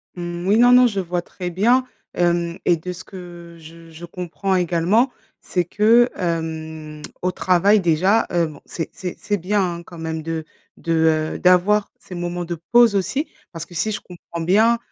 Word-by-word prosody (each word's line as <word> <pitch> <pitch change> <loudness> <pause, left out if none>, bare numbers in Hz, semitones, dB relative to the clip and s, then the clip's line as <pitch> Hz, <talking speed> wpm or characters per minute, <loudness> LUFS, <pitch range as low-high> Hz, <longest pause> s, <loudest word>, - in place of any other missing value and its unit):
Mmh, 175 0 -5
oui, 205 +2 +4
non, 245 +1 +6
non 250 0 +7
je 200 -4 -2
vois 175 -1 -2
très 180 -1 -6
bien, 235 +9 +2 0.3
hem 170 0 0
et 175 -2 +4
de 180 +3 -6
ce 175 - -10
que 175 -3 -11
je 165 +1 -14
je 165 +2 -10
comprends 180 +2 -3
également, 180 +8 +2 0.3
c'est 180 -2 -1
que, 225 +6 +4
hem, 160 -3 -4 0.2
au 185 - +1
travail, 185 +4 +3
déjà, 185 +5 +2
heu, 170 -1 +2
bon, 155 - -12
c'est 165 - -5
c'est 180 -2 -6
c'est 205 -1 -1
bien, 200 +3 0 0.2
hein 170 - -11
quand 170 - -13
même 160 -1 -4
de 160 0 -4 0.3
de, 165 - -2 0.4
heu, - - -6
d'avoir 185 +3 +3
ces - - -12
moments 175 0 -3
de 170 0 -4 0.2
pause 240 -3 +6
aussi 215 - -1 0.2
parce 165 -1 -7
que 175 - -16
si 215 +7 -1
je - - -4
comprends 170 -1 -9
bien, 220 +7 +4
175 Hz, 190 wpm, -21 LUFS, 170-200 Hz, 0.4 s, non